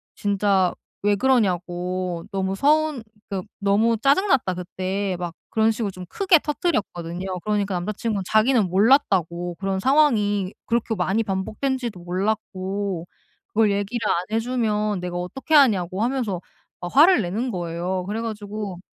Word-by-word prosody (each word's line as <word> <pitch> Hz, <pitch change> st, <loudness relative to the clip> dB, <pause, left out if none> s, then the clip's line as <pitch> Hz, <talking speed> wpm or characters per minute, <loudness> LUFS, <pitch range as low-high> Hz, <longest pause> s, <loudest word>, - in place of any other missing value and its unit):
진짜 200 Hz, -2 st, +1 dB, 0.3 s
왜 205 Hz, 0 st, +3 dB
그러냐고 180 Hz, -6 st, 0 dB
너무 190 Hz, 0 st, -1 dB
서운 300 Hz, +1 st, +2 dB, 0.3 s
그 195 Hz, -3 st, -3 dB, 0.2 s
너무 205 Hz, +3 st, +3 dB
짜증 280 Hz, -, +3 dB
났다, 250 Hz, -, +2 dB
그때. 185 Hz, +2 st, -3 dB
막 175 Hz, -2 st, -5 dB, 0.2 s
그런 220 Hz, 0 st, +3 dB
식으로 215 Hz, -2 st, -2 dB
좀 185 Hz, -1 st, -9 dB
크게 375 Hz, -4 st, +4 dB
터뜨렸거든요. 190 Hz, -, -2 dB
그러니까 205 Hz, -2 st, 0 dB
남자친구는 205 Hz, +3 st, -2 dB
자기는 220 Hz, -1 st, +4 dB
몰랐다고 180 Hz, -, +2 dB
그런 195 Hz, -1 st, -1 dB
상황이 210 Hz, -7 st, +2 dB
그렇게 230 Hz, -1 st, 0 dB
많이 190 Hz, +3 st, +1 dB
반복된지도 220 Hz, +3 st, -2 dB
몰랐고 190 Hz, -1 st, -2 dB, 0.4 s
그걸 215 Hz, -1 st, +2 dB
얘기를 205 Hz, +4 st, -2 dB
안 175 Hz, +1 st, +1 dB
해 -, -, +3 dB
주면 215 Hz, -4 st, 0 dB
내가 180 Hz, 0 st, -5 dB
어떻게 225 Hz, -, -4 dB
아냐고 200 Hz, -, +4 dB
하면서 235 Hz, -8 st, -1 dB, 0.4 s
막 175 Hz, -, -5 dB
화를 315 Hz, 0 st, +7 dB
내는 215 Hz, +7 st, -2 dB
거예요. 175 Hz, 0 st, -3 dB
그래 210 Hz, +2 st, -2 dB
가지고 210 Hz, -4 st, -5 dB
200 Hz, 325 characters per minute, -23 LUFS, 185-230 Hz, 0.4 s, 화를